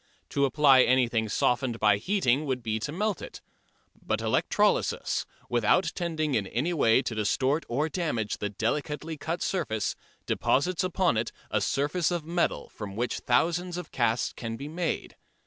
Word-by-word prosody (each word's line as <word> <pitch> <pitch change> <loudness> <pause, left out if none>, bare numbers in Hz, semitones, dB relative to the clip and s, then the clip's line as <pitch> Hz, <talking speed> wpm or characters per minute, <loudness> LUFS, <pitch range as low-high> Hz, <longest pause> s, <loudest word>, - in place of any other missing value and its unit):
To 140 - +2
apply 135 -1 +5
anything 120 -3 +2
softened 125 +2 +1
by 105 -2 +4
heating 150 - +1
would 130 -2 -2
be 110 -1 -1
to 140 +7 -4
melt 205 +3 -1
it. - - -8 0.6
But - - -1
electrolysis, - - +1 0.2
without 120 - +2
tending 160 -4 -2
in 105 -5 0
any 145 - -1
way 130 -5 +4
to 120 - -3
distort 130 +8 0
or 140 +6 0
damage 150 - -2
the 105 - -2
delicately 150 +9 -2
cut 165 +3 -3
surface, 110 - -1 0.3
deposits 175 +6 +1
upon 185 -7 +1
it 110 +1 -1 0.2
a - - +1
surface 150 +4 0
of 175 -3 -2
metal 170 +1 0
from 100 -2 -8
which 120 +3 -2
thousands 175 +7 +1
of 180 -3 -7
casts 115 -1 0
can 115 -1 -5
be 140 - -6
made. 165 +2 -3
140 Hz, 160 wpm, -28 LUFS, 115-165 Hz, 0.6 s, apply